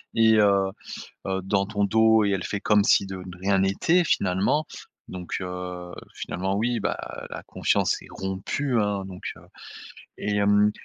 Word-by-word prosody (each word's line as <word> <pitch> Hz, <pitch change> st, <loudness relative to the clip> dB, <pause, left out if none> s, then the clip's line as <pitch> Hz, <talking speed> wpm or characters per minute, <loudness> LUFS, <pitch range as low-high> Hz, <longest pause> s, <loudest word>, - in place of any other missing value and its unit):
et 110 Hz, -1 st, +5 dB
heu 100 Hz, -2 st, +4 dB, 0.6 s
heu, 95 Hz, 0 st, -1 dB
dans 100 Hz, 0 st, +1 dB
ton 100 Hz, -1 st, -1 dB
dos 110 Hz, +1 st, +4 dB
et 100 Hz, -, +1 dB
elle 95 Hz, -, -1 dB
fait 100 Hz, 0 st, -3 dB
comme 105 Hz, -1 st, +4 dB
si 100 Hz, -, +4 dB
de 95 Hz, -1 st, -6 dB
de 90 Hz, -1 st, -9 dB
rien 95 Hz, +1 st, +1 dB
n'était 160 Hz, -, +2 dB
finalement. 100 Hz, +12 st, +1 dB, 0.4 s
Donc, 90 Hz, -1 st, -5 dB
heu, 90 Hz, -1 st, -6 dB, 0.2 s
finalement 95 Hz, +2 st, -3 dB
oui, 115 Hz, +2 st, 0 dB
bah, -, -, -1 dB, 0.3 s
la -, -, -7 dB
confiance -, -, 0 dB
est -, -, -13 dB
rompue, 100 Hz, +7 st, -2 dB
hein, 100 Hz, -2 st, 0 dB
donc, 95 Hz, -1 st, -10 dB
heu -, -, -15 dB, 0.8 s
et 105 Hz, 0 st, -2 dB
hem, 105 Hz, +1 st, +4 dB
100 Hz, 165 wpm, -25 LUFS, 95-105 Hz, 0.8 s, et